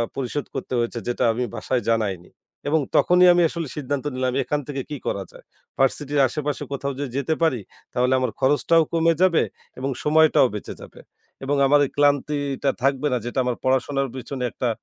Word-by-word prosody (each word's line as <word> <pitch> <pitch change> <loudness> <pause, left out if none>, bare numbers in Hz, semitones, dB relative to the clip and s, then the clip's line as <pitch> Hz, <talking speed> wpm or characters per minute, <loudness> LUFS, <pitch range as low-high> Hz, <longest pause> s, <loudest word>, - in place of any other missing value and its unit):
পরিশোধ 135 +2 -3
করতে 130 - -5
হয়েছে, 120 0 -2
যেটা 120 +1 -1
আমি 125 +2 -2
বাসায় 125 -2 -1
জানাইনি। 100 -6 -1 0.4
এবং 155 +2 +3 0.2
তখনই 180 +1 +5
আমি 175 - +3
আসলে 165 -2 -4
সিদ্ধান্ত 145 -1 -3
নিলাম 130 0 -1
এখান 145 +4 -1
থেকে 140 -2 -3
কি 150 - -4
করা 100 - -2
যায়? - - -16 0.3
ভার্সিটির 145 +2 +1
আশেপাশে 150 +2 -3
কোথাও 140 0 -3
যদি 140 -3 -4
যেতে 140 +3 0
পারি, 150 -7 +2 0.3
তাহলে 125 +1 +2
আমার 130 - -1
খরচটাও 145 +4 +3
কমে 165 0 +3
যাবে 185 -3 +4 0.4
এবং 135 +1 -2
সময়টাও 155 -3 +5
বেঁচে 105 - -6
যাবে। - - -13 0.4
এবং 140 +2 0
আমার 145 +2 +5
এই - - -7
ক্লান্তিটা 145 -1 +1
থাকবে 135 +1 +2
না - - +2
যেটা 120 +2 -2
আমার 125 -1 -1
পড়াশোনার 130 +1 +1
পেছনে 130 0 -5
একটা 125 - -2
140 Hz, 180 wpm, -23 LUFS, 130-150 Hz, 0.4 s, তখনই